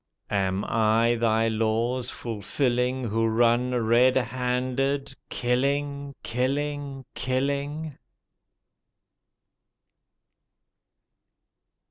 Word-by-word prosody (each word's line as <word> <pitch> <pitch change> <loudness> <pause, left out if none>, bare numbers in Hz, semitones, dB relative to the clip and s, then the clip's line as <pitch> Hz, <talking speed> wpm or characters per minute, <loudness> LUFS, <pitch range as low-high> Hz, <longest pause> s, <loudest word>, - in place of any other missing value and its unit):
Am 95 -1 0
I 115 +1 +3
Thy 115 -1 +2
laws 115 +3 0
fulfilling 125 +3 -1
Who 115 +2 +1
run 120 +2 +3
red 120 +2 +4
handed 130 +2 -1
— - - -53
^killing, 140 +3 -1
kiUing, 140 +2 -2
killing? 140 +3 -2
125 Hz, 65 wpm, -26 LUFS, 115-135 Hz, -, red